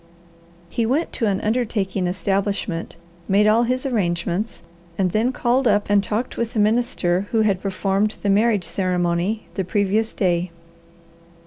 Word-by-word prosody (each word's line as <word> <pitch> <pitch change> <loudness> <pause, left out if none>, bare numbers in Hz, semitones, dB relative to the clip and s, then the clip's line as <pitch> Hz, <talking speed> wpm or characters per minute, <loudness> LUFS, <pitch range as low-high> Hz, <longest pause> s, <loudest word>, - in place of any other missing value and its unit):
He 230 - -1
went 270 +9 0
to 230 - 0
an 195 -1 +1
undertaking 210 -5 -1
establishment, 195 -1 -2 0.3
made 200 +2 +4
all 215 +2 +4
his 255 +2 0
arrangements, 190 -3 -1 0.3
and 185 -2 +1
then 225 +6 +1
called 250 +1 +1
up 205 -1 +2
and 200 -1 +4
talked 220 +4 -3
with 235 -1 -2
the 220 - 0
minister 210 -4 +1
who 225 - +2
had 200 -4 +1
performed 195 +2 0
the 205 - +1
marriage 210 -2 +2
ceremony 180 +3 -1
the 190 - -2
previous 205 +4 0
day. 180 -2 0
205 Hz, 145 wpm, -22 LUFS, 185-225 Hz, 0.3 s, made